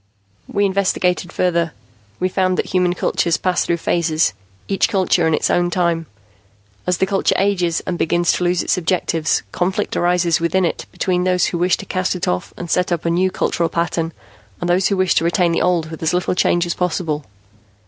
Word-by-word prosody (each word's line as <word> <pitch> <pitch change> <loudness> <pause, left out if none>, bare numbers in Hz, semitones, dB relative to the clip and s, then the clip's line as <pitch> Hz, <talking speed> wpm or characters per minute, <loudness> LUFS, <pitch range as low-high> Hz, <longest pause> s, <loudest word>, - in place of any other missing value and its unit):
"We 205 - +1
investigated 185 -2 0
further. 170 -3 0 0.5
We 185 - +1
found 185 0 0
that - - 0
human 180 -1 +1
cultures 170 -2 0
pass 185 -1 0
through 170 - 0
phases, 165 - +1 0.3
each 195 +3 +1
culture 185 -5 +2
in 160 - +3
its - - 0
own 175 0 +2
time. 170 -2 0 0.8
As 180 -1 +2
the - - +2
culture 195 0 +1
ages 180 -4 +1
and 175 - -3
begins 175 +1 +2
to - - -1
lose 175 0 +1
its - - +1
objectives, 165 -2 0
conflict 190 +3 -1
arises 175 -1 +2
within 170 +3 +1
it 170 - -3
between 180 -1 0
those 180 0 +2
who 170 - -2
wish 180 +1 +2
to - - -8
cast 185 0 -1
it 180 - -3
off 90 - -2
and 175 - -6
set 180 +2 0
up 170 -2 -1
a 170 - +2
new 185 +2 +2
culture 170 -2 -1
pattern, 170 0 -1 0.5
and 175 - -3
those 180 +1 +3
who 200 - 0
wish 185 -1 +2
to - - +2
retain 170 +1 +2
the 165 - 0
old 170 -3 +1
with 160 - -8
as 160 +2 +1
little 180 0 0
change 175 -1 +2
as 175 - -1
possible. 165 -4 -2
175 Hz, 200 wpm, -19 LUFS, 170-185 Hz, 0.8 s, in